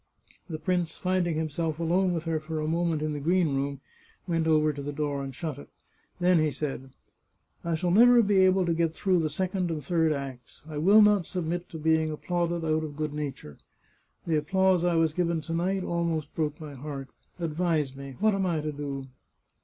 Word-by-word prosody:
The 160 - -3
prince, 175 +1 -1
finding 180 -3 0
himself 160 0 -2
alone 180 +3 +1
with 165 -2 -2
her 165 -2 -1
for 155 0 -4
a 155 - -2
moment 165 -1 0
in 155 0 -1
the 145 - -3
green 170 0 +2
room, 140 0 -2 0.5
went 165 -2 0
over 155 -1 +3
to 140 - -6
the 145 +1 -4
door 145 -1 -2
and 135 -2 -7
shut 150 -1 -4
it. - - -12 0.5
Then 180 -1 +4
he 155 -1 +2
said: 135 -2 -5 0.4
" - - -44
I 170 -1 0
shall 175 +2 0
never 240 +4 +7
be 200 -1 +2
able 185 0 +4
to 170 - +1
get 165 -1 0
through 185 -3 +2
the 160 -1 0
second 185 +3 -1
and 155 -4 -4
third 165 0 +2
acts. 135 -4 -6
I 155 -2 -5
will 200 +7 +7
not 205 -4 +4
submit 175 -1 -3
to 160 - -7
being 160 0 +2
applauded 170 +1 -2
out 155 0 +1
of 150 -2 -7
good 155 -1 -2
nature. 140 - -6 0.7
The 160 -2 +1
applause 185 +3 +2
I 175 -1 +2
was 165 -2 +2
given 170 -1 0
to 165 - -5
night 185 +3 0
almost 170 -4 -2
broke 150 -2 -2
my 150 -2 -8
heart. 140 0 -7 0.3
Advise 160 -4 0
me. 140 -1 -8
What 215 +1 +3
am 195 -1 0
I 165 -3 0
to 150 0 -3
do 140 -2 -5
160 Hz, 210 wpm, -28 LUFS, 150-175 Hz, 0.7 s, never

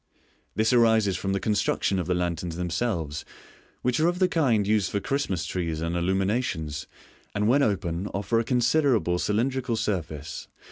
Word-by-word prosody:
This 110 +5 +2
arises 110 -5 +4
from 95 - -2
the 100 - 0
construction 100 -1 0
of 90 - -3
the 90 - +1
lanterns 85 -1 -2
themselves, 85 -3 -2 0.6
which 125 +2 +1
are 160 - +4
of 175 0 0
the 185 0 +3
kind 135 - +2
used 105 -2 +2
for 100 - -1
Christmas 100 - -1
trees 85 -3 -2
and 85 +1 -2
illuminations, 95 - -1 0.5
and 105 +1 +1
when 135 +5 +4
open 95 -5 0
offer 100 +4 0
a - - +1
considerable 120 - +2
cylindrical 125 +4 0
surface 80 -9 -3
(see - - -14
Fig. - - -41
100 Hz, 170 wpm, -26 LUFS, 85-120 Hz, 0.6 s, arises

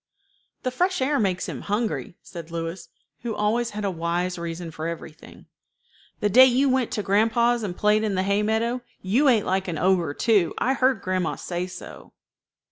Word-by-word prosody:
"The 255 - -1
fresh 360 +7 0
air 275 +2 +1
makes 190 -4 0
him - - -5
hungry," 210 -3 -2
said 170 -2 -9
Louis, 165 +1 -5 0.3
who 230 -2 -3
always 230 +3 0
had 210 -1 -5
a 195 - 0
wise 175 +1 -2
reason 170 0 -5
for 155 +1 -5
everything. 165 -2 -9 0.8
"The 210 - +3
day 255 +6 +8
you 260 +2 +3
went 260 -2 +1
to 210 - -2
grandpa's, 230 +4 +2
and 190 -5 -4
played 210 +1 +3
in 210 -3 0
the 185 - +1
hay 200 +1 +1
meadow, 225 +3 0 0.2
you 235 +10 +2
ate 230 -6 +4
like 190 +1 0
an 170 -3 -3
ogre 175 -4 +1
too. 210 -7 +2
I 260 - +1
heard 260 -4 +2
grandma 185 -2 -1
say 175 0 -4
so." 185 - -11
205 Hz, 185 wpm, -24 LUFS, 175-235 Hz, 0.8 s, day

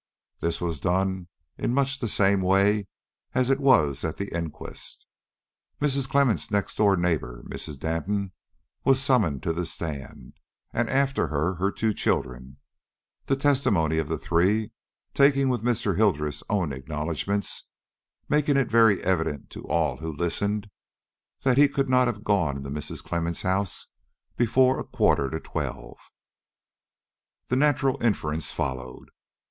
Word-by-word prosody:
This 85 - -1
was 85 -4 -2
done 95 +2 0 0.3
in 120 - 0
much 135 -1 +1
the 115 - -2
same 100 -2 +3
way 100 +2 +3 0.5
as 130 +1 +2
it 135 - +2
was 80 - +3
at - - -2
the 100 - -5
inquest. 85 -2 -6 0.7
Mrs. 140 -2 +1
Clemmens' 130 -5 +2
next 100 -1 -1
door 100 -3 +4
neighbor, 75 -9 -1
Mrs. 75 - -6
Danton, 90 +6 -2 0.5
was 135 -1 +4
summoned 110 - +2
to 80 - 0
the 85 +2 -2
stand, 75 -5 -6 0.4
and 120 0 0
after 135 0 +1
her 80 +4 0
her 100 +3 +1
two 110 0 0
children, 65 -5 -2 0.7
the 135 - +2
testimony 110 - +2
of 80 - -2
the - - -2
three, 100 +6 +1 0.4
taken 140 -1 +4
with 125 -2 0
Mr. 110 -6 0
Hildreth's 75 -9 +1
own 90 -8 0
acknowledgments, 75 +8 -2 0.6
making 150 -1 +2
it 135 -4 +1
very 110 -4 +5
evident 80 -6 -1
to - - -9
all 75 -5 +1
who 80 +3 -5
listened 100 +6 -1 0.7
that 130 0 +3
he 145 -1 +7
could 135 -1 -1
not 125 -1 +4
have 110 -3 -3
gone 90 -10 +1
into 70 0 -7
Mrs. 75 0 -5
Clemmens' 85 -1 -2
house 95 0 -1 0.5
before 130 +2 +3
a - - -3
quarter 70 - +1
to 80 - -3
twelve. - - -5 1.5
The 125 - +2
natural 135 -1 +2
inference 80 - 0
followed. 65 -2 -5
100 Hz, 140 wpm, -26 LUFS, 80-125 Hz, 1.5 s, he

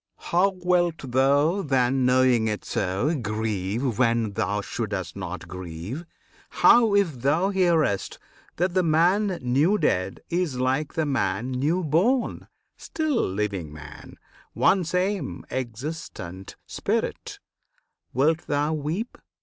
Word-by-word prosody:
How 180 +3 +2
wilt 175 -2 +2
thou, 140 +8 +3
then, 130 -4 +1
Knowing 125 -3 +3
it 105 -1 -3
so, 100 - -1
grieve 110 - -2
when 115 -3 +2
thou 105 +1 -1
shouldst 100 -6 -4
not 95 -2 -6
grieve? 90 - -7 0.4
How, 225 -4 +5
if 165 -11 +1
thou 160 +9 +2
hearest 170 - +1 0.4
that 180 +1 0
the 185 - +3
man 180 +4 +2
new 145 +11 +3
dead 95 - 0
Is, 170 -7 -1
like 135 +4 0
the 160 - +1
man 125 -4 -1
new 150 +8 0
born, 190 - +1 0.3
still 310 -6 -1
living 95 -5 -3
man 75 -1 -11 0.4
One 190 -1 +3
same, 180 +4 -2
existent 120 - -6
Spirit - - -3 0.7
wilt 155 +6 +1
thou 145 +2 0
weep? 160 +10 -3
135 Hz, 115 wpm, -25 LUFS, 110-175 Hz, 0.7 s, How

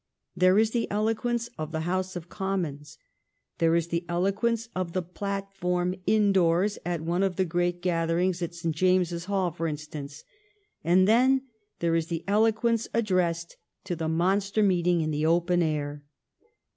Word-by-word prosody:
There 185 +2 +4
is 220 0 +3
the 235 -1 -1
eloquence 225 +3 0
of 155 0 -4
the 160 -1 -2
House 185 +2 -2
of 175 -1 -6
Commons. 160 -7 -4 0.6
There 165 0 +3
is 170 0 0
the 170 +1 -1
eloquence 205 +6 0
of 180 -2 -3
the 185 - -1
platform 185 -1 -2
indoors 195 -2 +3
at 175 -2 -2
one 170 +3 -1
of 195 -2 +1
the 190 - +1
great 175 +1 -1
gather 165 -2 +1
ings 180 0 0
in 170 - -2
St. 170 -2 -3
James's 180 -1 +1
Hall, 190 -3 0
for 165 0 -3
instance; 150 -1 -7 0.6
and 180 +4 +4
then 260 +4 +4 0.4
there 170 -1 +1
is 165 -1 +1
the 165 -1 -4
eloquence 225 +2 +2
addressed 180 -6 0 0.3
to 185 -2 -3
the 160 -1 -2
monster 195 +5 +1
meeting 180 -3 +2
in 155 0 -1
the 150 +1 0
open 175 +1 +2
air. 150 -2 -2
180 Hz, 160 wpm, -27 LUFS, 165-195 Hz, 0.6 s, There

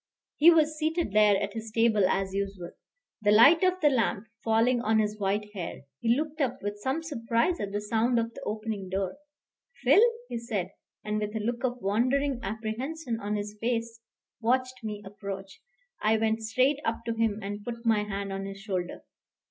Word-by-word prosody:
He 315 +3 +8
was 310 -2 +3
seated 320 - 0
there 210 -1 +5
at 200 - -3
his 225 0 -6
table 215 -3 +3
as 190 0 0
usual, 195 -3 -3 0.5
the 205 - +2
light 275 - +7
of 370 0 +2
the 300 - +6
lamp 230 -4 0 0.2
falling 230 +2 +3
on 220 -1 +2
his 210 0 0
white 205 +1 -1
hair; 175 -7 -6 0.2
he 235 +1 +2
looked 310 +1 -3
up 260 -3 0
with 205 0 -3
some 265 +9 -2
surprise 235 +2 0
at 200 - -3
the 205 +1 -2
sound 225 +3 +1
of 230 0 -1
the - - -10
opening 215 -3 -4
door. 190 0 -2 0.7
"Phil," - - +6 0.3
he 235 - -4
said, 210 -6 -3 0.3
and 210 0 -1
with 210 +1 -3
a - - 0
look 235 +3 -2
of 250 -1 0
wondering 255 +6 +1
apprehension 230 +6 -4
on 210 0 -2
his 205 0 -4
face, 230 -1 -2 0.4
watched 255 +2 +1
my 210 -1 -4
approach. 195 -1 -7 0.4
I 220 +1 +3
went 220 0 0
straight 255 +6 +2
up 230 +1 -2
to 230 - -1
him 225 -2 0
and 205 +1 -5
put 235 +1 -6
my 220 -2 +3
hand 200 -1 -4
on 195 0 -4
his 195 0 -8
shoulder. 185 -3 -4
220 Hz, 190 wpm, -28 LUFS, 205-245 Hz, 0.7 s, He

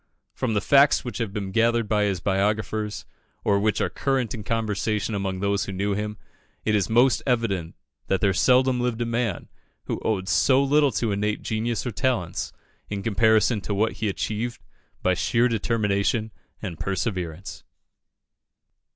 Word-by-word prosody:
From 115 -4 -2
the 105 - +2
facts 140 0 +4
which 120 - -5
have 115 -4 -2
been 100 -1 -4
gathered 115 +1 +2
by 105 0 +2
his 95 -3 -1
biographers, 105 +2 -1 0.4
or 100 -1 +3
which 105 +1 +1
are - - +1
current 135 -5 -1
in 110 - -6
conversation 110 -1 -1
among 95 -2 -2
those 100 0 +1
who - - -5
knew 100 +2 -1
him, 105 +1 -3 0.5
it 105 - +2
is 105 0 +1
most 120 +1 +4
evident 105 -9 0 0.3
that 95 - +1
there 100 -1 +2
seldom 130 +4 +3
lived 120 -2 -1
a 120 - 0
man 115 -2 -2 0.4
who - - -3
owed 95 -4 -1
so 130 - +4
little 145 0 +3
to 115 -3 0
innate 105 +1 -1
genius 110 +1 -2
or 125 - -2
talents, 110 -7 -1 0.4
in 100 -1 -4
comparison 110 +1 +3
to 100 - -3
what 110 +3 +2
he 110 -2 -2
achieved 110 +4 -3 0.4
by 95 - +3
sheer 115 +6 +2
determination 110 -1 0 0.3
and 90 -6 -5
perseverance. 95 -3 -3
105 Hz, 160 wpm, -25 LUFS, 100-115 Hz, 0.5 s, facts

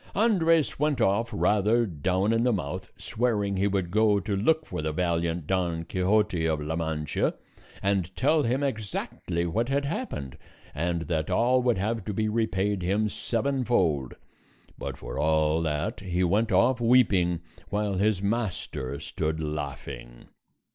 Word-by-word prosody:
Andres 165 -10 +3
went 150 -3 +1
off 115 +1 +2
rather 105 +3 +2
down 95 +4 0
in 115 - +2
the 125 - +3
mouth, 95 -1 -4
swearing 110 -4 -1
he 95 +2 +2
would 95 -3 -1
go 105 0 +3
to 100 +1 -2
look 155 +11 +2
for - - -4
the 80 0 -1
valiant 85 -1 -1
Don 85 -2 -1
Quixote 95 0 +1
of 80 -2 0
La 75 +2 -3
Mancha 80 -2 -1 0.5
and 95 -2 0
tell 155 +4 +3
him 130 +2 0
exactly 100 -7 -3
what 115 +9 -1
had 140 +1 +1
happened, 140 - -4 0.3
and 85 +2 -1
that 80 -1 -2
all 125 +2 +3
would 120 -3 +2
have 110 +2 -1
to 105 - -3
be 110 +1 0
repaid 105 -3 0
him 100 +4 +1
sevenfold; 115 - 0 0.6
but - - -6
for - - -6
all 80 +1 +2
that 75 -2 -2
he 90 -2 -1
went 105 +6 +2
off 120 +6 +3
weeping, 100 -8 +3 0.3
while 105 0 -1
his 100 0 +1
master 100 - -2
stood 80 +1 -3
laughing. 70 -5 -6
100 Hz, 150 wpm, -27 LUFS, 85-115 Hz, 0.6 s, Andres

